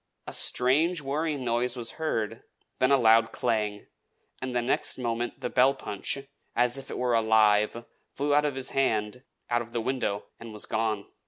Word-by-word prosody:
A - - -7
strange 155 +8 +2
whirring 145 -1 -2
noise 120 +1 0
was 115 -2 -4
heard, 115 -9 -2 0.4
then 130 - +3
a 140 - +6
loud 115 -2 +5
clang; 105 -4 -1 0.6
and 130 -1 -4
the - - +3
next 125 - 0
moment 120 +1 -3
the 125 - -2
bell 135 +2 +4
punch, 100 -1 -2 0.4
as 125 +2 +3
if 135 - -10
it - - -5
were 125 -1 0
alive, 110 0 +3 0.3
flew 145 +1 -1
out 150 +1 +4
of 145 -2 -1
his 135 -1 -2
hand, 115 -3 0 0.3
out 120 0 +2
of 120 0 -10
the 120 - 0
window, 125 -5 -2
and 115 -1 -9
was 105 - -2
gone! 110 -2 -1
120 Hz, 180 wpm, -27 LUFS, 110-135 Hz, 0.6 s, a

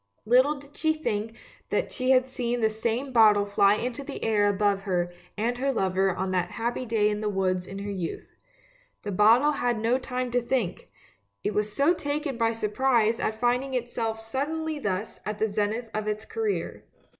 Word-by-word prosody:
Little 255 +6 +4
did 285 0 -14
she 315 -1 +2
think 225 -7 -3 0.3
that - - -1
she 255 -1 -2
had 255 -1 +5
seen 245 -2 -2
the 220 0 +3
same 235 +5 -2
bottle 210 -3 +6
fly 200 0 +4
into 245 +4 -3
the 275 0 -7
air 210 -2 +3
above 200 0 +1
her 175 -3 -1 0.2
and 235 +3 0
her 275 +1 +1
lover 190 -4 +1
on 190 0 -2
that 180 -1 0
happy 240 +2 -2
day 220 -2 +2
in 210 0 -1
the 210 - 0
woods 185 -2 0
in 195 - -7
her 200 +1 -4
youth. 180 -4 -5 0.7
The 205 - -3
bottle 225 +9 +5
had 245 -5 0
no 235 +4 +2
time 250 -1 -3
to 245 0 +2
think, 235 -7 -2 0.5
it 210 - -1
was 210 0 0
so 285 +9 +3
taken 290 -3 -3
by 230 -1 +2
surprise 225 +1 +1
at 220 0 -2
find 245 +2 +2
ing 270 -1 -5
itself 230 -2 -2
suddenly 295 +7 -3
thus 205 -3 -3
at 210 0 -4
the 220 - +1
zenith 215 +3 -2
of 215 0 -2
its 215 +1 -2
career. 440 -2 -3
225 Hz, 190 wpm, -27 LUFS, 205-255 Hz, 0.7 s, bottle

